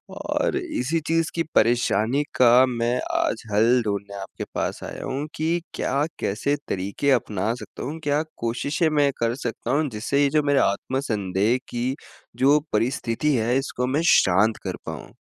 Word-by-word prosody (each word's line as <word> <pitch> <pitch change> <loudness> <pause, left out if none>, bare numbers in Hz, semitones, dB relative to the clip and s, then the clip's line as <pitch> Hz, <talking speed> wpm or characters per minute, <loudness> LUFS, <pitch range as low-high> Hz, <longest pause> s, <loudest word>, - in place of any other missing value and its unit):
और - - -1
इसी 165 - -1
चीज़ 165 0 +1
की 165 - +1
परेशानी 120 +3 +2
का 125 +1 +6
मैं 120 0 0 0.2
आज 115 - 0
हल 115 +4 +4
ढूँढ़ने 100 -1 -3
आपके 95 - -7
पास - - -2
आया - - -7
हूँ 140 +3 -3
कि 165 +2 0
क्या, 140 +3 0
कैसे 110 +8 0
तरीके 100 +9 -1
अपना 110 -3 0
सकता 105 - -9
हूँ? 155 +5 -5
क्या 145 +1 +1 0.2
कोशिशें 140 +8 0
मैं 140 -1 +4
कर 115 +1 +1
सकता 115 +1 -3
हूँ, 145 +2 +2
जिससे 120 +5 -1
ये 140 - +3
जो 150 +1 +2
मेरे 145 -1 +3
आत्म-संदेह 105 -2 0
की 125 +3 -2 0.4
जो 140 +3 +5
परिस्थिति 125 +4 0
है 120 +2 +1
इसको, 130 -2 -2
मैं 145 +5 +1
शांत 105 +5 +3
कर - - -2
पाऊँ? - - -7
125 Hz, 160 wpm, -24 LUFS, 110-145 Hz, 0.4 s, का